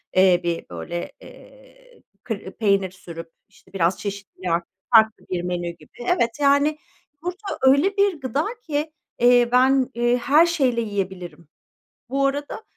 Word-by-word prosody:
eee, 185 -2 +5
bir 170 -1 -2
böyle, 175 0 -5
eee, - - -17 0.2
kı 220 -4 -4 0.2
peynir 200 -3 +2
sürüp, 165 -3 -10 0.2
işte, 205 - -24
biraz 180 -1 +1
çeşitliliği 195 -3 -5
arttı 170 +1 0 0.3
farklı 220 0 +4
bir 180 -1 -2
menü 175 -1 -2
gibi. 170 - -13 0.2
Evet, 235 -8 +1
yani, 285 +2 +3 0.4
yumurta 370 +4 -5
öyle 280 +10 +4
bir 395 -5 +2
gıda 275 +4 -1 0.2
ki, 300 0 -2 0.3
eee, 245 0 +5
ben, 260 +1 +4
eee, 240 +1 +2
her 285 +7 +4
şeyle 270 -9 +1
yiyebilirim. 190 -6 -5 0.6
Bu 275 +1 +1
arada 285 +9 -3
240 Hz, 140 wpm, -23 LUFS, 185-290 Hz, 0.6 s, eee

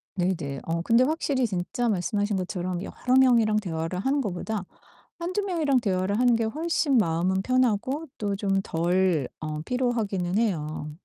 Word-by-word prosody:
네네. 165 -7 -1
어 165 +1 -1
근데 230 +6 +4
확실히 280 -4 0
진짜 200 +5 -2
말씀하신 205 +1 0
것처럼 180 -1 -3
여러 255 +5 -1
명이랑 230 -5 +4
대화를 165 -3 -3
하는 275 +7 +1
것보다 205 0 -3 0.6
1-2 365 +4 -2
명이랑 315 -9 +1
대화를 195 -1 0
하는 245 -1 +4
게 225 - 0
훨씬 300 +2 0
마음은 185 0 +1
편하고 255 +5 +1
또 205 -2 -2
좀 195 -1 0
덜 175 -4 +1
어 155 -1 -4
피로하기는 215 -6 -1
해요. 155 -8 -1
205 Hz, 315 characters per minute, -26 LUFS, 180-250 Hz, 0.6 s, 근데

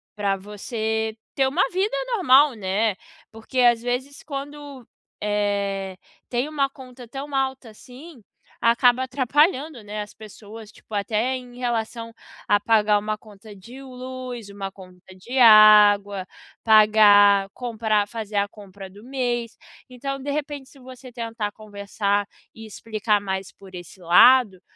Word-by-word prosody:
pra 200 -2 -1
você 220 +2 -4 0.2
ter 270 - +2
uma 290 +8 +1
vida 410 +7 -1 0.2
normal, 285 - +5
né, 205 +1 -1 0.4
porque 225 +4 -6
às 240 -2 +4
vezes 250 +3 -4
quando, 285 -2 -8 0.4
eh, 200 -2 -2 0.3
tem 245 +3 -1
uma 280 -3 0
conta 255 -2 -13
tão 275 +4 -8
alta 265 -2 -2
assim, 255 +6 -14 0.4
acaba 245 +2 +3
atrapalhando, 275 - 0
né, 210 +1 -6
as 210 - -9
pessoas, 215 0 -13
tipo, 220 - -18
até 215 +5 -1
em 245 -1 -13
relação 230 -1 -4 0.3
a 205 0 +3
pagar 210 -1 +2
uma 215 +1 -4
conta 210 -1 -15
de 235 +8 -13
luz, 255 -3 -8
uma 200 -1 -7
conta 185 -1 -16
de 240 +8 -7
água, 210 -3 +6 0.4
pagar 205 -2 +5
comprar 220 -4 -1
fazer 215 -1 -7
a 200 - +1
compra 200 -2 -12
do 205 +3 -16
mês. 240 -3 -3 0.3
Então, 275 +2 -6
de 285 - -4
repente 285 -2 -5
se 280 - -19
você 255 0 -13
tentar 230 -3 -5
conversar 205 -1 -3 0.3
e 225 0 -11
explicar 215 -1 -2
mais 190 -1 -4
por 195 -1 -17
esse 175 +2 -11
lado, 190 +3 +5
225 Hz, 140 wpm, -23 LUFS, 205-255 Hz, 0.4 s, água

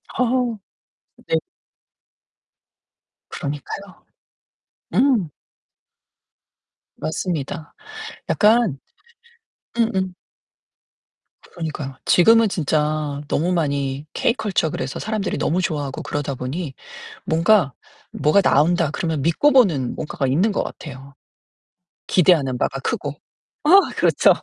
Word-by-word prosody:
아. 255 - +2 1.0
네. - - +1 1.9
그러니까요. 150 +7 -6 0.9
음. 245 - +3 1.7
맞습니다. 160 -1 -4 0.6
약간 215 - +3 1.0
음음. 190 -5 0 1.4
그러니까요. 155 -5 -5
지금은 225 +5 +6
진짜 150 -3 -1
너무 170 +5 0
많이 140 -4 -1
케이 235 - +1
컬쳐 200 -9 0
그래서 135 -2 -4
사람들이 215 -2 -2
너무 175 +4 0
좋아하고 145 -6 -3
그러다 145 -2 -3
보니 135 +4 -4 0.5
뭔가 165 -3 +3 0.4
"뭐가 155 +7 +3
나온다." 170 0 +3
그러면 160 -2 -2
믿고 170 - +3
보는 170 - +3
뭔가가 150 -3 -3
있는 175 +12 +2
것 - - 0
같애요. 135 -2 -9 0.9
기대하는 155 -8 +3
바가 135 +1 -1
크고. 145 0 -2 0.5
아 295 - +1 0.3
그렇죠. - - +4
160 Hz, 215 characters per minute, -21 LUFS, 140-190 Hz, 1.9 s, 지금은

